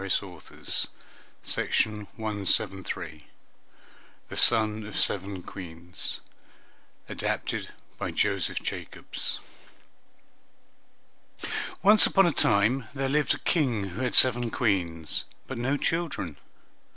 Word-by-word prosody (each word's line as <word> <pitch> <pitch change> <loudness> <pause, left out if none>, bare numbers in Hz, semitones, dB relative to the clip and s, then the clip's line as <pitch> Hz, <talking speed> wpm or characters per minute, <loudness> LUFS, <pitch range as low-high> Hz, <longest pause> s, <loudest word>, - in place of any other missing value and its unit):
EAST 100 +1 +1
INDIAN 90 -5 -13 0.8
STORIES 105 -2 +1 2.2
THE - - -6
SON 110 -2 +4
OF 105 - -6
SEVEN 95 -1 -1
QUEENS 85 -1 -5 0.9
ADAPTED - - -2 0.3
BY - - -2
JOSEPH - - 0
JACOBS - - -4 2.4
Once 210 +2 +8
upon 195 -1 +5
a 170 - +3
time 115 0 +3
there 135 0 -1
lived 145 -1 +2
a - - -7
King 120 - 0
who 95 +8 -6
had 125 -5 0
seven 120 -2 +6
Queens, 85 -10 0 0.2
but 130 -3 -5
no 135 +4 +1
children. 145 - -2
110 Hz, 95 wpm, -28 LUFS, 95-130 Hz, 2.4 s, Once